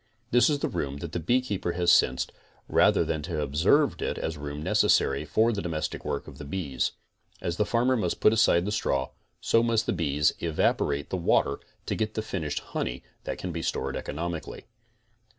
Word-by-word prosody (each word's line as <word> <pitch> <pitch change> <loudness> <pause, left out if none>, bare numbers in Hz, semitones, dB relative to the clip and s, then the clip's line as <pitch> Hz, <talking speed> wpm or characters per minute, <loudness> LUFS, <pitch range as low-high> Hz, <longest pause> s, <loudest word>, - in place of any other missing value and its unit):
This 120 +2 +5
is 150 - +2
the - - -1
room 70 -5 -3
that 80 +2 -6
the 85 - -2
beekeeper 100 -2 0
has 85 0 +3
sensed, 65 - +3 0.4
rather - - +4
than 80 -2 -2
to 85 +4 -6
have 75 - 0
observed 85 - +2
it - - -2
as 80 - -3
room 75 0 -6
necessary 70 -1 +3
for 115 +8 +2
the 100 - -2
domestic 80 -3 -3
work - - -3
of - - -11
the - - -6
bees. 70 -5 -2 0.5
As 85 0 -3
the 105 - +1
farmer 125 +2 +2
must 90 -8 -1
put 105 - +5
aside 100 -6 +4
the 105 - -2
straw, 65 -9 0 0.3
so 115 - +3
must 115 -1 +1
the - - 0
bees 75 -4 +1
evaporate 70 -3 0
the 95 - 0
water 70 -5 +2 0.3
to - - -2
'get 110 -1 -2
the 110 - -1
finished 80 -9 -3
honey 60 - -3 0.2
that - - -3
can 90 - -4
be 85 0 -4
stored - - -2
economically. 85 +1 -5
85 Hz, 195 wpm, -27 LUFS, 75-110 Hz, 0.5 s, This